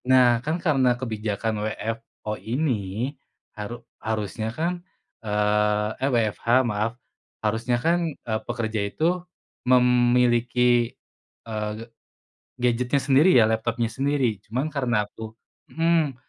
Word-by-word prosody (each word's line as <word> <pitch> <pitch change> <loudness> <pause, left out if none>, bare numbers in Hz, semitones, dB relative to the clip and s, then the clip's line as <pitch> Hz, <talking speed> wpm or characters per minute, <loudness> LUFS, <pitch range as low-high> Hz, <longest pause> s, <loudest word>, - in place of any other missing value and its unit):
Nah, 125 -2 +5
kan, 155 +5 -1
karena 135 -8 +2
kebijakan 110 -2 -2
WFO 110 0 -4
ini, 120 -2 -1 0.4
haru 120 +3 -7 0.2
harusnya, 110 0 -2
kan, 175 +2 -1 0.4
eee 105 0 +1
eh, 135 - +2
WFH, 115 -2 0 0.2
maaf. 110 +1 -1 0.5
Harusnya, 115 +3 +1
kan, 165 +5 +1
eee, 110 -7 -4
pekerja 115 -3 -2
itu 175 - 0 0.5
memiliki, 125 -1 +3 0.5
eee, 110 -2 -3
g - - -8 0.8
gadgetnya 125 +2 +1
sendiri, 145 +6 +5
ya, 110 - +6
laptopnya 115 +1 0
sendiri. 135 -7 0
Cuman 125 +7 -2
karena 120 -7 +1
aku 110 +1 -9 0.4
mhm, 165 -3 +2
120 Hz, 110 wpm, -25 LUFS, 110-130 Hz, 0.8 s, ya